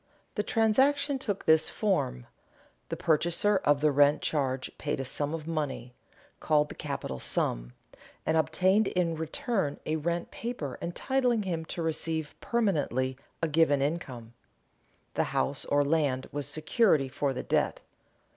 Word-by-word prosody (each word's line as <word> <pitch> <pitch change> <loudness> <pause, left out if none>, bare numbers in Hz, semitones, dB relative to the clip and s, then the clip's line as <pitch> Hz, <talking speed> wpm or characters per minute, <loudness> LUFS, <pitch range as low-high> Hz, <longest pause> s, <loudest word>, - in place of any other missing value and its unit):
The 210 - 0
transaction 265 +7 +2
took 205 -7 -3
this 160 0 +4
form: 180 - -1 0.6
the - - -3
purchaser 170 +6 +3
of 145 -5 +2
the 150 0 +4
rent 145 +1 +4
charge 135 -4 -1
paid 145 -2 -2
a 135 - -2
sum 145 +3 -2
of 160 -1 -5
money, 145 -6 -3 0.5
called 150 -1 +2
the - - -7
capital 140 - -5
sum, - - -1 0.5
and 160 - +1
obtained 185 +7 +3
in 175 -2 0
return 160 - -2
a 155 +1 0
rent 170 +2 -2
paper 225 - -5
entitling 245 +5 0
him 165 -4 -3
to 170 - -4
receive 160 -1 -2
permanently 145 - 0 0.3
a - - +3
given 155 -2 +3
income. 135 -6 -3 0.8
The - - +1
house 65 - 0
or 145 0 +2
land 140 -4 +1
was 145 -1 -3
security 155 - +2
for 140 +1 -1
the 125 - -4
debt. - - 0
155 Hz, 145 wpm, -29 LUFS, 140-185 Hz, 0.8 s, this